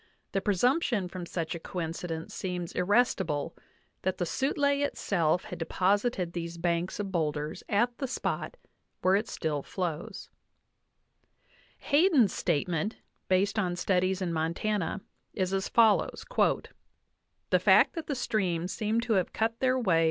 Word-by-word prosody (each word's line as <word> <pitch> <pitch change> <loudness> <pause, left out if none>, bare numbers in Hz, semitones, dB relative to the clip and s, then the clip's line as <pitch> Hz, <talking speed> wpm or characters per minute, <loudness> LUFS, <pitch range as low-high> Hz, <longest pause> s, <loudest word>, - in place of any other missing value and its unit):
The 195 - 0
presumption 215 - +2
from 175 -1 -7
such 165 -3 -3
a 170 - -5
coincidence 165 -1 -5
seems 180 -2 -4
irrestible, 180 - +1 0.5
that 185 - -1
the 175 - -1
Sutlej 280 - +1
itself 175 - +1
had 180 - -8
deposited 185 +2 0
these 170 0 -4
banks 170 +2 -1
of 200 -2 -3
boulders 150 -3 -2
at 235 +4 +2
the 270 - -1
spot 260 - -3 0.5
where 185 +1 +5
it 210 +3 0
still 150 -3 -2
flows" 170 0 -5 1.5
(47). - - -11
Hayden's 290 - +5
statement, 170 +4 0 0.3
based 195 +3 +2
on 180 -4 0
studies 185 +1 +1
in 170 -2 -2
Montana, 170 +5 -1 0.3
is 185 -1 -1
as 195 0 -1
fol 225 -3 +6
lows: - - -6 1.3
"The - - +5
fact - - +5
that 330 -2 -5
the 285 - -1
streams 185 -8 -1
seem 220 +2 0
to 235 -1 0
have 185 -4 +1
cut 225 +1 -1
their 260 0 +2
way"? 185 -10 +3
185 Hz, 145 wpm, -29 LUFS, 170-220 Hz, 1.5 s, fol